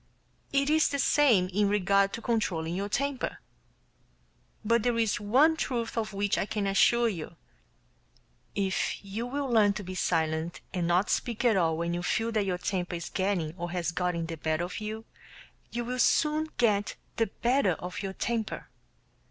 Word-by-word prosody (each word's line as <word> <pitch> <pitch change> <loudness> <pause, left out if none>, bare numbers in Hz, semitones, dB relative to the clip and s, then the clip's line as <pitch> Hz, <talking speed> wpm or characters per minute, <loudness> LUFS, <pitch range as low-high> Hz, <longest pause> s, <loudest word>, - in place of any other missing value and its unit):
It 275 0 +2
is 315 0 +4
the 280 - -1
same 255 -10 +4
in 200 +2 +1
regard 200 0 +3
to 230 - -5
controlling 175 -8 -1
your 200 +3 -2
temper. 275 +4 -1 1.3
But 230 +1 +3
there 240 +1 +1
is 220 -2 +1
one 265 +10 +4
truth 240 -7 -2
of 220 -2 -2
which 200 0 0
I - - -1
can 210 -2 -2
assure 235 +5 +4
you: 175 -8 -5 1.2
If 195 0 -1
you 215 +5 -4
will 280 +2 -2
learn 215 -5 +4
to 205 - -6
be 185 0 -6
silent 160 -2 -1
and 175 -3 -1
not 180 +4 +2
speak 235 0 -1
at 230 -3 +5
all 165 -4 +2
when 170 +1 -1
you 175 - -2
feel 225 +6 0
that 215 -3 0
your 180 -1 0
temper 180 -1 -2
is 170 0 -5
getting 185 -5 -1
or 175 0 -3
has 175 -1 -2
gotten 175 -1 -1
the 165 0 -6
better 155 +2 -1
of 180 - -6
you, 215 +1 -5 0.6
you 240 0 -3
will 250 +1 -3
soon 305 +4 +3
get 210 -3 +2 0.2
the 225 - +2
better 235 -2 +1
of 180 +4 -6
your 195 -1 -4
temper. 225 +1 -3
205 Hz, 175 wpm, -29 LUFS, 180-235 Hz, 1.3 s, at